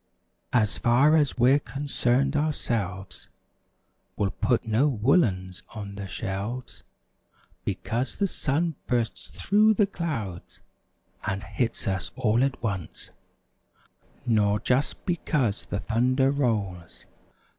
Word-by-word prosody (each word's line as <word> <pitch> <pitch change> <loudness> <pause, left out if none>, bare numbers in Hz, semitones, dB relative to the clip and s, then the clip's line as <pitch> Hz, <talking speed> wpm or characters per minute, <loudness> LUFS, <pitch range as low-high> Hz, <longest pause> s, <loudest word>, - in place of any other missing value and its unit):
As 110 -4 +2
far 130 +6 +5
as 150 -4 +2
we're 130 +4 +5
concerned 140 -1 0
ourselves. 110 - -2 0.9
We'll 100 -1 +1
put 120 +2 0
no 115 +7 +3
woolens 105 - +1
on 100 -2 -6
the 100 -1 -6
shelves. 100 +8 -5 0.8
Because 120 +4 -2
the 200 - +2
sun 165 0 0
bursts 120 -2 -1
through 215 +2 +3
the 205 - +4
clouds 135 - -5 0.7
And 95 +1 -2
hits 120 -2 -2
us 95 -4 -2
all 115 +4 +2
at 135 -2 -1
once; 100 -7 -4 1.1
Nor 105 -2 +3
just 130 +6 0
because 150 - 0
the - - -2
thunder 130 +5 +2
rolls. 105 -11 -2
120 Hz, 110 wpm, -26 LUFS, 100-140 Hz, 1.1 s, far